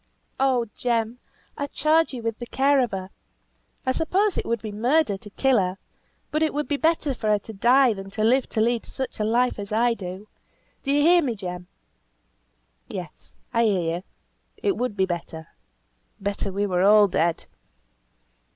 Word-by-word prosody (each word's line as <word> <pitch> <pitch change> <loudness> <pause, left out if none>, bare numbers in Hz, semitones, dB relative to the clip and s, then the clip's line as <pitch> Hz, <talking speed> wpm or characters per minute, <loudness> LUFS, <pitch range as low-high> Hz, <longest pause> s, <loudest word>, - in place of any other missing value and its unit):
"Oh! 260 -3 +2
Jem, 235 -1 -1 0.4
I 285 - -3
charge 310 +3 +2
you 245 -4 -6
with 225 -1 -3
the 240 - -6
care 275 +2 +3
of 250 -2 +2
her! 190 -1 -6 0.7
I 260 - +2
suppose 375 +7 +1
it - - -3
would 235 -1 0
be 215 - -4
murder 240 +2 +2
to 205 - -12
kill 260 +3 +2
her, 185 0 -1 0.5
but 305 - 0
it 315 -2 +1
would 295 -2 -1
be 290 - 0
better 320 -1 +1
for 220 -3 -3
her 210 - +4
to 215 +2 -10
die 245 +4 +4
than 195 -1 -8
to 215 +2 -3
live 250 +4 +3
to 220 - 0
lead 235 +1 +1
such 265 -3 -6
a - - +1
life 240 +2 +1
as 200 0 -6
I 235 +2 +3
do. 190 -1 -7 0.5
Do 275 - -2
you 290 +1 +3
hear 345 +2 +6
me, 250 -7 -1
Jem?" 180 -3 -6 1.2
"Yes! - - -9 0.2
I 230 0 +3
hear 175 -5 +1
you. 180 - -9 0.5
It 395 - 0
would 245 -4 -3
be 190 - +3
better. 165 -3 -6 0.7
Better 200 0 -2
we 200 +2 -1
were 180 -3 0
all 205 +1 +6
dead." 170 -2 0
230 Hz, 185 wpm, -24 LUFS, 200-270 Hz, 1.2 s, hear